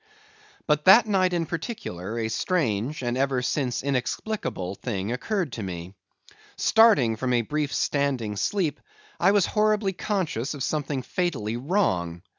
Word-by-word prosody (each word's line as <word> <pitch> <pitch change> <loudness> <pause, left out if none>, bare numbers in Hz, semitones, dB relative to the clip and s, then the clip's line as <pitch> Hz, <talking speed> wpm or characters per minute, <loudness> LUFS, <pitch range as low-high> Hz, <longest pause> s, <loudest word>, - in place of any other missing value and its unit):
But 150 -1 +1
that 215 +5 +8
night, 190 -4 +2
in 170 -2 0
particular, 155 - -5
a 115 -1 -1
strange 130 - -1
(and 120 0 -1
ever 130 -1 0
since 125 -2 -1
inexplicable) 135 - -2
thing 100 -1 -4
occurred 175 - -2
to 115 - -5
me. 90 -1 -6 0.6
Starting 210 - +5
from 125 +2 -1
a 120 -1 +2
brief 150 +3 -2
standing 135 -7 0
sleep, 155 - -1 0.4
I - - +4
was 200 -3 +4
horribly 210 -2 +1
conscious 170 - -2
of 140 - -4
something 145 -3 -2
fatally 125 - -2
wrong. 105 - -1
140 Hz, 140 wpm, -25 LUFS, 115-185 Hz, 0.6 s, that